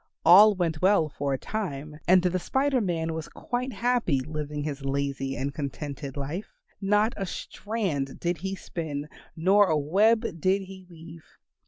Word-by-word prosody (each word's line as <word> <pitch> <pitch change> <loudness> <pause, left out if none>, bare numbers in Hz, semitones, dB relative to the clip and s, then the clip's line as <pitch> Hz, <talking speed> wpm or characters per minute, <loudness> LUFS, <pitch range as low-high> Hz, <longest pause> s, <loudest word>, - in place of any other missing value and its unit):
All 200 +5 +8
went 165 -4 -1
well 185 -4 +4
for 140 -1 -3
a 135 - +1
time 150 -6 -5
and 185 0 +6
the 185 0 +1
Spider 265 +7 +1
Man 165 -4 -1
was 160 -1 -5
quite 250 +2 -3
happy 235 - +1
living 150 +1 -4
his 145 -2 -4
lazy 135 -1 -2
and 140 +1 -2
contented 140 -1 -5
life. 150 +9 -5 0.3
Not 210 +3 +2
a 195 - -3
strand 180 -12 -3
did 170 -1 -1
he 190 +3 -3
spin, 150 -6 -5 0.3
nor 195 +5 +4
a 155 - +2
web 205 +10 +3 0.2
did 190 +3 +2
he 190 -1 -12
weave. 165 -1 -12
170 Hz, 160 wpm, -27 LUFS, 145-200 Hz, 0.3 s, All